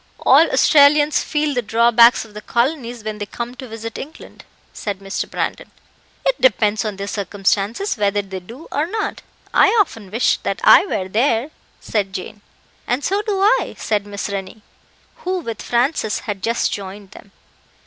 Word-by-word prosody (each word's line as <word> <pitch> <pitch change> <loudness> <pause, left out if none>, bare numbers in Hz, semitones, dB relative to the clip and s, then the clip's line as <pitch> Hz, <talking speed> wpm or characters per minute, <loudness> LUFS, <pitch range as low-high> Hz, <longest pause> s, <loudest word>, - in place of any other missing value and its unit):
"All - - +6
Australians 295 0 +5
feel 300 -1 -1
the 245 - 0
drawbacks 235 +1 +4
of 215 - -17
the 210 - -8
colonies 240 -2 -1
when 215 -1 -5
they 205 - -4
come 235 +3 -6
to 255 0 -9
visit 225 0 -7
England," 305 +4 -11 0.3
said 205 -2 -4
Mr. 195 0 -4
Brandon. - - -3 0.6
"It - - 0
depends 215 -3 +3
on 215 -2 -3
their 200 +1 -5
circumstances, 205 - -1
whether 205 0 +1
they 190 -1 -7
do 230 - -12
or 295 +3 0
not. 430 +4 -3 0.3
I - - +6
often 225 - -1
wish 230 +5 +1
that - - -3
I - - +7
were 185 - -2
there," 230 +6 +1 0.3
said 200 -3 -2
Jane. 205 +2 -7 0.5
"And 250 +4 -1
so 400 +2 0
do 410 -2 -2
I," 430 +5 +2
said 205 -2 -1
Miss 200 -1 -4
Rennie, 200 +1 -6 0.5
who 370 +1 -2
with 230 - -5
Francis 240 -2 0
had 205 -3 -5
just 230 +3 0
joined 195 0 -8
them. 200 - -15
225 Hz, 170 wpm, -19 LUFS, 205-280 Hz, 0.6 s, I